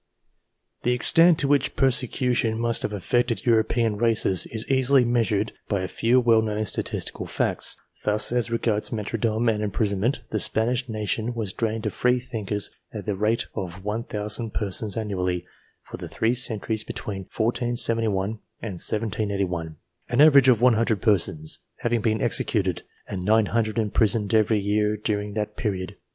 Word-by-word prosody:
The 125 - +1
extent 165 +7 +5
to 140 - -1
which 140 -1 +1
persecution 125 -3 +1
must 115 -1 +2
have - - -2
affected 110 +2 -1
European 115 -1 +2
races 110 -5 +1
is 110 -1 -3
easily 130 -1 +3
measured 110 -3 0 0.2
by 100 -3 -1
a 95 - -3
few 120 +6 +2
well 115 -2 +4
known 110 -1 -2
statistical - - -3
facts. - - 0 0.3
Thus, 105 +2 +3
as 120 -1 +1
regards 115 -2 -1
martyrdom 115 +1 -1
and 110 -2 +1
imprison 100 -1 -1
ment, 120 +8 0
the 110 - 0
Spanish 120 +5 +2
nation 110 +2 -2
was 105 -5 -2
drained 110 -1 -2
of 110 - -2
free 125 0 +2
thinkers 110 -5 -4 0.2
at - - -7
the 105 - -1
rate 105 +4 0
of 90 +1 -6
1,000 105 +1 -1
persons 105 +1 +1
annually, 90 -5 -2 0.4
for - - -9
the - - -7
three 115 +2 0
centuries 110 -3 -2
between 95 -2 -6
1471 115 -3 0 0.2
and 100 -6 -6
1781; 100 -7 -1 0.3
an 120 - -1
average 140 -3 +7
af 120 -4 +4
100 115 -3 +3
persons 80 -8 0 0.2
having 120 -1 0
been 110 0 0
excuted - - +1 0.3
and 95 -2 -5
900 110 +2 +1
imprisoned 110 -1 +1
every 110 0 +3
year 105 +1 0
during 105 -1 -3
that 105 -1 -3
period. 95 -5 -3
110 Hz, 150 wpm, -24 LUFS, 105-120 Hz, 0.4 s, average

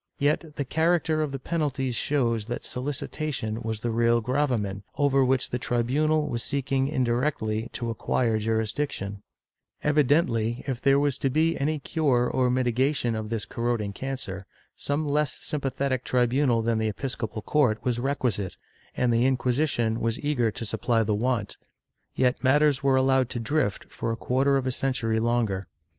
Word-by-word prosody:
Yet 150 +2 0
the 140 - -2
character 160 +1 +1
of 150 -2 -1
the 135 - -3
penalties 135 -3 -1
shows 115 -6 0
that 120 +2 -4
solicitation 130 -3 -3
was 110 -2 -3
the 120 - -1
real 115 +1 +3
gravamen, 115 -6 -1 0.2
over 140 -2 +3
which 130 0 +1
the 125 - -1
tribunal 150 +7 +1
was 120 -3 -2
seeking 135 -1 0
indirectly 120 -4 0
to 120 -2 -3
acquire 115 0 0
jurisdiction/ 110 -2 -2 0.6
Evidently, 135 -6 +2
if 130 -3 -3
there 140 -1 +4
was 145 -2 0
to 135 - +1
be 160 +4 +2
any 155 +3 0
cure 135 -5 +1
or 130 -1 +1
mitigation 125 0 +1
of 110 -1 -4
this 115 -2 -3
corroding 115 -4 -2
cancer, 100 -7 -5 0.3
some 150 +2 -1
less 150 0 +1
sympathetic 135 -3 -2
tribunal 125 -1 +2
than 115 -1 +1
the 110 -1 0
episco 120 -1 -4
pal 110 -2 -6
court 130 -8 +2
was 120 -2 0
requisite, 120 -8 -1 0.4
and 120 -2 +2
the 120 +2 +3
Inquisition 125 -3 +1
was 115 +1 -1
eager 140 -6 +1
to 115 - -5
supply 115 +1 +1
the 105 0 0
want, 110 -1 -1 0.6
yet 125 0 +1
matters 145 +1 +4
were 135 -1 +3
allowed 130 -1 +3
to 120 - -3
drift 115 -3 0
for 115 - -3
a 115 - -3
quarter 135 +3 +2
of 135 - -2
a 130 - 0
cen 135 +1 -1
tury 115 -3 0
longer. 110 -6 0
125 Hz, 165 wpm, -26 LUFS, 115-140 Hz, 0.6 s, there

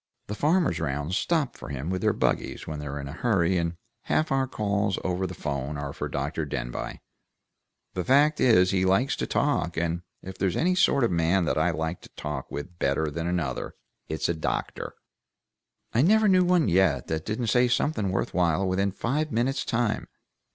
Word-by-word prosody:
The 105 - -5
farmers 160 - +2
round 75 +2 -2
stop 155 - 0
for - - -9
him 70 +5 -4
with 95 0 -2
their - - +3
buggies, - - -1
when 75 -1 -5
they're 75 -1 -5
in 70 - -5
a - - -6
hurry, 95 -3 +1
and 85 0 -2 0.3
half 155 -1 +1
our 135 -1 +2
calls 100 -4 0
over 95 0 -1
the 90 - -7
'phone 70 -1 -3
are 70 -1 -4
for - - -4
Dr. 75 +4 -2
Denbigh. 60 -4 -4 0.9
The 90 - -2
fact 145 - +4
is 95 -7 +5
he 95 -1 +2
likes 95 +9 +2
to - - -2
talk, 85 - 0
and 85 +1 0 0.2
if 95 0 -9
there's 95 -3 +1
any 180 +3 +2
sort 145 -7 +3
of 115 - +2
man 85 +2 +2
that 75 - +1
I 85 +3 +3
like 80 +1 -3
to - - -14
talk 75 -3 -5
with 85 +4 -7
better 75 +3 +1
than 85 +3 -3
another, 85 -7 -2 0.3
it's 80 0 -1
a 85 - +1
doctor. 80 - -3 1.0
I 115 - +4
never 215 +7 +5
knew 185 -2 +5
one 175 -3 +3
yet 85 -8 +3
that 80 0 -2
didn't 110 +4 -2
say 125 0 +4
something 125 -4 0
worth 95 - -1
while 90 +1 +2
within 95 +2 +1
five 145 +10 -1
minutes' 125 +4 0
time. 115 -2 -1
95 Hz, 195 wpm, -26 LUFS, 80-120 Hz, 1.0 s, is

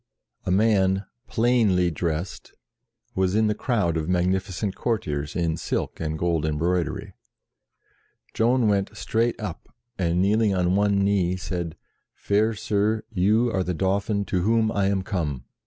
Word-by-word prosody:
A - - +1
man 95 -1 +3 0.2
plainly 110 -7 +2
dressed 80 +2 -4 0.6
was 95 +1 +1
in 110 0 +3
the 105 - +2
crowd 105 - 0
of 80 +1 -3
magnificent 95 +2 0
courtiers 75 -11 -2
in 85 -2 0
silk - - -3
and 80 -1 -2
gold 85 -2 0
embroidery. 80 +3 -1 1.2
Joan 120 +1 +2
went 100 -1 0
straight 115 +1 0
up, 105 -6 -6 0.3
and 85 -1 +1
kneeling 105 +1 +3
on 90 0 +2
one 100 0 +2
knee, 95 -3 +2
said, 85 -3 -4 0.4
"Fair 110 +2 +1
Sir, 105 +1 0
you 110 +5 +2
are 95 - +1
the 90 -1 -2
Dauphin 100 +3 0
to 90 -2 -1
whom 110 +2 +2
I 100 -3 +1
am 100 -1 0
come." 75 - -3
95 Hz, 140 wpm, -24 LUFS, 85-105 Hz, 1.2 s, man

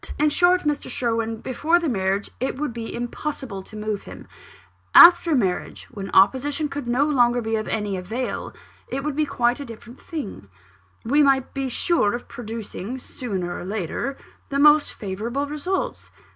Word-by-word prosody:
In 300 +1 +3
short, 360 +3 +4
Mr. 295 -1 -2
Sherwin, 230 -2 -1
before 310 +7 +1
marriage, 200 - -1
it 260 - -1
would 290 -4 -2
be 230 -1 -5
impossible 240 -3 -5
to 200 - -13
move 210 -1 -3
him - - -11 0.7
after 345 -2 +9
marriage, 190 -8 -1
when 200 -1 -6
opposition 275 +9 +3
could 280 -3 -5
no 250 +4 +2
longer 245 -5 +3
be 225 -1 -1
of 215 0 -2
any 210 -3 -2
avail, 225 +8 -4 0.4
it 270 +1 -4
would 300 -1 -2
be 305 0 +1
quite 245 -2 +1
a - - -4
different 235 +1 -12
thing: 275 - -6 0.6
we 285 +6 +4
might 270 -2 +3
be 270 -1 -2
sure 245 -5 +1
of 240 - -7
producing, 225 0 -6
sooner 190 -9 -5
or - - -6
later, 205 - -3 0.3
the 275 - -1
most 300 +1 +6
favourable 225 +8 -3
results. 365 +11 -3
245 Hz, 160 wpm, -23 LUFS, 215-290 Hz, 0.7 s, after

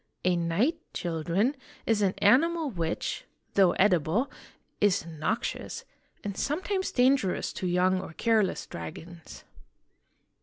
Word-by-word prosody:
A 180 -1 +4
knight, 175 - +1 0.2
children, 175 - 0 0.3
is 225 -2 +2
an 195 -2 +2
animal 290 +9 +3
which, 170 -5 -3 0.3
though 190 -3 +5
edible, 190 - +2 0.5
is 205 -5 +2
noxious, 170 - -3 0.4
and 200 -1 -4
sometimes 375 - -1
dangerous 250 -6 +2
to 185 - -3
young 185 +1 +2
or 175 - -9
careless 220 0 +1
dragons. 160 - -9
195 Hz, 110 wpm, -28 LUFS, 170-250 Hz, 0.5 s, though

